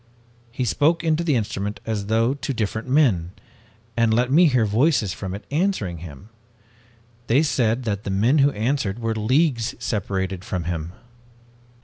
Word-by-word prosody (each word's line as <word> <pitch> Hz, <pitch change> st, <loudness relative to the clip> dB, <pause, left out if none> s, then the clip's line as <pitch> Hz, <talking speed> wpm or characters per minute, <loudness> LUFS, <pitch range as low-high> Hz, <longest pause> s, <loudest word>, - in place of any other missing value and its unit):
He 125 Hz, +1 st, -2 dB
spoke 160 Hz, +8 st, +2 dB
into 160 Hz, 0 st, +1 dB
the 155 Hz, -5 st, +1 dB
instrument 105 Hz, -2 st, -3 dB
as 105 Hz, -3 st, -3 dB
though 115 Hz, +4 st, +2 dB
to 140 Hz, 0 st, -4 dB
different 110 Hz, +2 st, -3 dB
men, 115 Hz, -, +2 dB, 0.6 s
and 115 Hz, -1 st, +2 dB
let 125 Hz, +3 st, +1 dB
me 170 Hz, +4 st, +6 dB
hear 125 Hz, -6 st, +2 dB
voices 110 Hz, -, +2 dB
from 95 Hz, -1 st, -5 dB
it 100 Hz, -, -10 dB
answering 150 Hz, -, -1 dB
him! 80 Hz, +3 st, -11 dB, 1.0 s
They 135 Hz, +7 st, +4 dB
said 125 Hz, -5 st, +1 dB
that 105 Hz, -3 st, -2 dB
the -, -, -5 dB
men 115 Hz, +10 st, +2 dB
who 140 Hz, +1 st, +5 dB
answered 120 Hz, -4 st, -1 dB
were 115 Hz, -1 st, -2 dB
leagues 120 Hz, +2 st, +1 dB
separated 95 Hz, -5 st, -3 dB
from 95 Hz, -5 st, -3 dB
him! 85 Hz, 0 st, -4 dB
115 Hz, 155 wpm, -23 LUFS, 100-140 Hz, 1.0 s, me